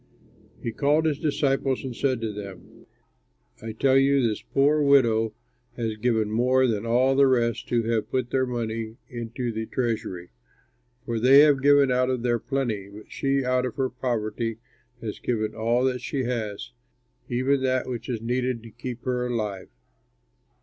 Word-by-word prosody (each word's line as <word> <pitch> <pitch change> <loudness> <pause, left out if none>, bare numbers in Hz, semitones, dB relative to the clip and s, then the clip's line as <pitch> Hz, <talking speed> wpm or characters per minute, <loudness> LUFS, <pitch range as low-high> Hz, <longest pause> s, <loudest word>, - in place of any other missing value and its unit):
He 115 - -2
called 145 +6 +2
his 150 -3 0
disciples 135 -3 0
and 130 -3 -5
said 130 -2 0
to 110 -2 -3
them, 100 -4 -10 0.7
"I 110 - -5
tell 130 +4 +3
you, 140 +1 +3
this 110 - -3
poor 145 +2 +2
widow 115 -6 +3 0.4
has 115 -2 -2
given 110 -1 0
more 125 +3 +3
than 115 -2 -1
all 125 +3 +3
the 140 0 +5
rest 120 -3 0
who 120 -1 +1
have 115 -1 -1
put 125 -2 -2
their 130 -1 +1
money 115 -2 -4
into 120 0 -4
the 110 0 -4
treasury, 110 -8 -3 0.7
for 115 -1 -2
they 135 +4 +7
have 145 -3 +4
given 140 -1 +5
out 125 0 +2
of 125 -2 -1
their 120 -1 +1
plenty, 115 -8 -2
but 105 +2 -13
she 135 -1 0
out 125 0 +1
of 125 -3 -3
her 130 -1 -1
poverty 115 -2 -2 0.4
has 110 -2 -5
given 110 -3 -2
all 115 +3 +1
that 130 -2 0
she 140 -2 -2
has, 115 -2 -4 0.6
even 130 +3 +1
that 130 -1 0
which 120 -1 -5
is 115 -3 -2
needed 125 0 -1
to 115 - -11
keep 120 +2 -7
her 125 -1 -1
alive." 105 -6 -3
125 Hz, 170 wpm, -25 LUFS, 115-130 Hz, 0.7 s, they